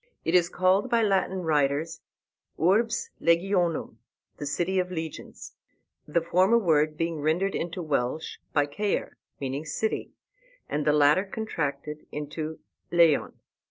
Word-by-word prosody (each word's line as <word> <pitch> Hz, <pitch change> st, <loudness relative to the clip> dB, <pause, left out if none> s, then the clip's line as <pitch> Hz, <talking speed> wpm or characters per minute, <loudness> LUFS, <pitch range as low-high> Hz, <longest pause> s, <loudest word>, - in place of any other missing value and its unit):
It 165 Hz, -, 0 dB
is 175 Hz, -1 st, +4 dB
called 185 Hz, +6 st, +2 dB
by 235 Hz, -1 st, +3 dB
Latin 190 Hz, -2 st, +1 dB
writers 155 Hz, +1 st, 0 dB, 0.6 s
Urbs 215 Hz, +7 st, +2 dB
Legionum, 170 Hz, 0 st, +1 dB, 0.4 s
the 145 Hz, -, -5 dB
City 175 Hz, +6 st, 0 dB
of 180 Hz, 0 st, -1 dB
Legions. 160 Hz, -3 st, -7 dB, 0.5 s
The 165 Hz, +3 st, +1 dB
former 185 Hz, +7 st, +4 dB
word 155 Hz, -7 st, +2 dB
being 165 Hz, -2 st, -2 dB
rendered 175 Hz, +6 st, +1 dB
into 175 Hz, +1 st, -3 dB
Welsh 145 Hz, 0 st, -2 dB
by 145 Hz, -1 st, +3 dB
Caer, 200 Hz, +8 st, -2 dB, 0.2 s
meaning 135 Hz, +2 st, -3 dB
city, 190 Hz, +8 st, -2 dB, 0.5 s
and 150 Hz, 0 st, -2 dB
the -, -, +6 dB
latter 150 Hz, +5 st, +5 dB
contracted 150 Hz, -8 st, -4 dB
into 155 Hz, +2 st, -5 dB, 0.3 s
lleon. 170 Hz, -4 st, +4 dB
165 Hz, 125 wpm, -27 LUFS, 150-185 Hz, 0.6 s, the